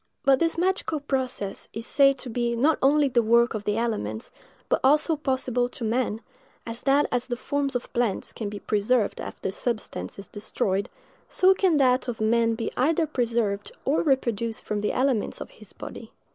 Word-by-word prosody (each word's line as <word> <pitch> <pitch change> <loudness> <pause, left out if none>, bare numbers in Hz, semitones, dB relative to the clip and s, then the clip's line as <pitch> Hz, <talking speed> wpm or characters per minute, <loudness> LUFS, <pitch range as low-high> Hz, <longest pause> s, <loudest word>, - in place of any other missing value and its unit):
But 270 -1 +5
this 330 0 +1
magical 360 -3 0
process 260 -8 -2
is 225 +1 -5
said 275 0 +4
to 255 - -7
be 235 0 0
not 290 +7 +2
only 285 +2 +4
the 245 -2 +3
work 235 +2 +4
of 215 -2 -5
the 210 +1 0
elements, 110 - -2 0.4
but - - +2
also 300 +4 +4
possible 260 -4 0
to 245 - -8
man; 225 -1 0 0.4
and 230 - -5
that 275 +4 +2
as 245 0 0
the 245 - -2
forms 280 +1 -2
of 245 - -4
plants 235 -5 -1
can 215 -3 -4
be 205 - -6
preserved 210 +2 0
after - - -5
the - - -3
substance 225 +2 -4
is 200 - -8
destroyed, 200 -2 -2 0.4
so 375 +1 +5
can 370 -4 +2
that 255 -2 +3
of 240 -2 -4
man 230 +1 +2
be 225 - -3
either 320 +5 +2
preserved 230 -7 -1
or 285 - +2
reproduced 235 -6 0
from 210 -1 -2
the 210 - 0
elements 255 -4 0
of - - -8
his - - -12
body. - - -9
245 Hz, 185 wpm, -25 LUFS, 220-275 Hz, 0.4 s, But